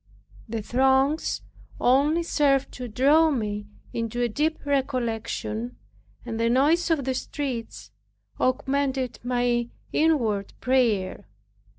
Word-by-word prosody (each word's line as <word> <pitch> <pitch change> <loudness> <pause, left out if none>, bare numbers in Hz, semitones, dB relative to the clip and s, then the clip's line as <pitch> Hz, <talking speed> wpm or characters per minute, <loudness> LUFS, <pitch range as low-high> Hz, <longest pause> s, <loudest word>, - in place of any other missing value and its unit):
The 220 -1 -3
throngs 265 +6 +2 0.4
only 290 +7 +3
served 280 -4 +2
to 250 -1 -6
draw 285 +8 +4
me 210 -6 -2 0.3
into 230 +1 -3
a - - +3
deep 300 +7 -1
recollection, 230 - -2 0.5
and 225 - -4
the 230 0 +2
noise 300 +9 +3
of 315 -4 +2
the 265 - 0
streets 250 - -5 0.5
augmented 265 0 0
my 245 -1 0 0.2
inward 235 -11 +1
prayer. 230 - +1
255 Hz, 105 wpm, -25 LUFS, 230-280 Hz, 0.5 s, draw